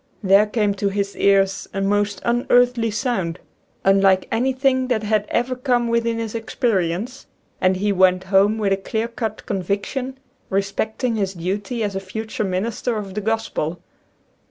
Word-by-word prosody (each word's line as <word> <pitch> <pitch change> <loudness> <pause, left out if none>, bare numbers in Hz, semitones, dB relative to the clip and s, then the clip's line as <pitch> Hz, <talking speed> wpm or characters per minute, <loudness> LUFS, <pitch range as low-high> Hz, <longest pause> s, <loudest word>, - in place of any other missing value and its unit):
There 195 +2 +5
came 210 -2 +1
to 200 0 -1
his 200 0 -2
ears 195 -1 +2
a - - -1
most 205 0 0
unearthly 245 -1 +3
sound, 205 -7 -1 0.5
unlike 195 -1 +4
anything 260 +2 +1
that 230 -4 0
had 210 0 +1
ever 255 +1 0
come 245 -2 +1
within 230 0 +1
his 225 -2 -4
experience, 225 0 -1 0.3
and 185 0 +3
he 205 +2 +1
went 185 -1 +3
home 195 +3 +3
with 200 -3 +1
a - - +1
clear 220 +3 -2
cut 225 -2 -5
conviction 205 +8 -3 0.3
respecting 220 +5 -1
his 195 -2 -1
duty 200 +7 -3
as 200 -2 -2
a - - 0
future 215 +3 -4
minister 215 +5 -2
of 200 -3 -5
the 210 - -3
Gospel. 210 -6 -2
210 Hz, 155 wpm, -21 LUFS, 195-235 Hz, 0.5 s, There